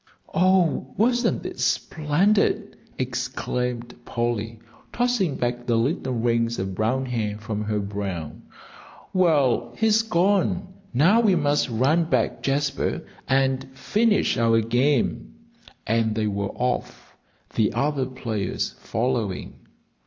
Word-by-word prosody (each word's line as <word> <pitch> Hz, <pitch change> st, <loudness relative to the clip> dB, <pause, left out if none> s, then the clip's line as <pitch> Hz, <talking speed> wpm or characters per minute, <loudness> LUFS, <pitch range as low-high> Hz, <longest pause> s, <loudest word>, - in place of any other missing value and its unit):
"Oh, 180 Hz, -7 st, +2 dB
wasn't 240 Hz, +3 st, +1 dB
it -, -, -6 dB
splendid!" 195 Hz, +7 st, +1 dB, 0.2 s
exclaimed 125 Hz, -1 st, -3 dB
Polly, 115 Hz, -2 st, -2 dB, 0.3 s
tossing 240 Hz, -, +1 dB
back 120 Hz, 0 st, -2 dB
the 120 Hz, -, +2 dB
little 130 Hz, +2 st, 0 dB
rings 115 Hz, 0 st, +1 dB
of 95 Hz, 0 st, -3 dB
brown 120 Hz, +7 st, 0 dB
hair 110 Hz, -4 st, -2 dB
from 105 Hz, -1 st, -4 dB
her 105 Hz, 0 st, -1 dB
brow. 100 Hz, -6 st, -4 dB, 0.8 s
"Well, 140 Hz, -9 st, +2 dB
he's 220 Hz, 0 st, +4 dB
gone; 190 Hz, -2 st, +1 dB, 0.2 s
now 165 Hz, -, +4 dB
we 210 Hz, -5 st, +4 dB
must 145 Hz, -3 st, +1 dB
run 135 Hz, +9 st, +2 dB
back, 165 Hz, -, 0 dB
Jasper, 140 Hz, +1 st, -1 dB, 0.2 s
and 135 Hz, 0 st, +1 dB
finish 215 Hz, +5 st, +2 dB
our 115 Hz, -1 st, +4 dB
game." 120 Hz, -, 0 dB, 0.5 s
And 110 Hz, -1 st, +1 dB
they 110 Hz, -1 st, 0 dB
were 100 Hz, -1 st, -1 dB
off, 125 Hz, 0 st, -3 dB, 0.4 s
the 110 Hz, -2 st, +2 dB
other 140 Hz, -3 st, 0 dB
players 110 Hz, -7 st, -3 dB
following. 115 Hz, -5 st, -3 dB
125 Hz, 115 wpm, -24 LUFS, 115-165 Hz, 0.8 s, he's